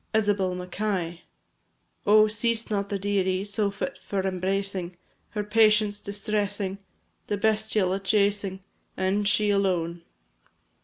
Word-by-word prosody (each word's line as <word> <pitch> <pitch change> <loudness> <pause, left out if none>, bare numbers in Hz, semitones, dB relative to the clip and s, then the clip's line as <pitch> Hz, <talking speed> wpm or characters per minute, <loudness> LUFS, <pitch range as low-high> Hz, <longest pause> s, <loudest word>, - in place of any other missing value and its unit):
Isabel 205 -4 +2
Mackay, 180 -1 -2
&c. - - -22 0.9
Oh, 215 +1 +7
seest 220 +1 0
not 200 -1 -1
the 200 - -1
dearie 190 -1 0
So 205 0 -1
fit 200 +7 -5
for 195 -1 -3
embracing, 190 -1 -2 0.3
Her 210 -2 -3
patience 215 -1 +3
distressing, 200 -1 -2 0.5
The 205 - -1
bestial 215 -2 +1
a 195 - -1
chasing, 200 -1 +1 0.3
And 195 +2 +1
she 210 0 +3
alone! 175 -4 0
200 Hz, 120 wpm, -26 LUFS, 190-210 Hz, 0.9 s, Oh